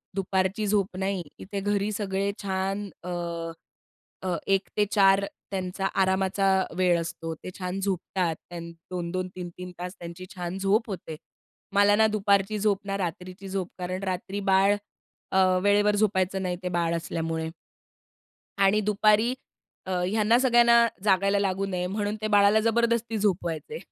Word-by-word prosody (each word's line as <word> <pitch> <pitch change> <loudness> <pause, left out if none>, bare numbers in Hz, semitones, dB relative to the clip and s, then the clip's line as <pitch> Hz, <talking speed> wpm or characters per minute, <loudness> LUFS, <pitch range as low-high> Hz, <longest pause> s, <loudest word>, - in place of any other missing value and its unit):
दुपारची 190 +2 0
झोप 200 -2 0
नाही. 190 -1 -1 0.2
इथे 200 +1 -5
घरी 205 +1 0
सगळे 200 -1 -1
छान 195 +1 -2
अ, 180 - -6 1.1
अ, 185 -2 -1
1:00 195 -2 +1
ते 210 - +4
4:00 195 -1 +5 0.3
त्यांचा 190 0 -2 0.2
आरामाचा 190 +1 +1 0.3
वेळ 180 -2 +3
असतो. 165 0 -5
ते 170 - -9
छान 185 +1 -3
झोपतात, 185 -3 -1
त्या 175 -1 -6 0.3
2-2, 180 +1 -3
3-3, 180 0 -7
तास 180 +1 -5
त्यांची 170 +1 -8
छान 180 +1 -4
झोप 210 +4 +1
होते. 175 -4 -6 0.6
मला 205 +1 +5
ना 220 +1 +5
दुपारची 205 0 +2
झोप 205 -1 +2
ना 195 0 -1
रात्रीची 185 +2 -5
झोप 190 -2 -2
कारण 185 +1 -4
रात्री 190 +1 -3
बाळ 195 +2 +5 0.6
अ, 190 - +3 0.2
वेळेवर 205 +1 +4
झोपायचं 190 -2 +1
नाही 180 -1 -1
ते 180 - -1
बाळ 170 -1 +1
असल्यामुळे. 160 -1 -3 1.1
आणि 200 +1 +4
दुपारी 215 +3 +3 0.5
अ, - - -5
ह्यांना 215 +4 +3
सगळ्यांना 235 -2 +5 0.2
जागायला 200 0 +3
लागू 195 0 0
नये 180 -2 -2
म्हणून 205 +2 -2
ते 215 - -2
बाळाला 205 +1 +6
जबरदस्ती 235 0 +1
झोपवायचे. 190 - -1
195 Hz, 145 wpm, -26 LUFS, 180-205 Hz, 1.1 s, बाळाला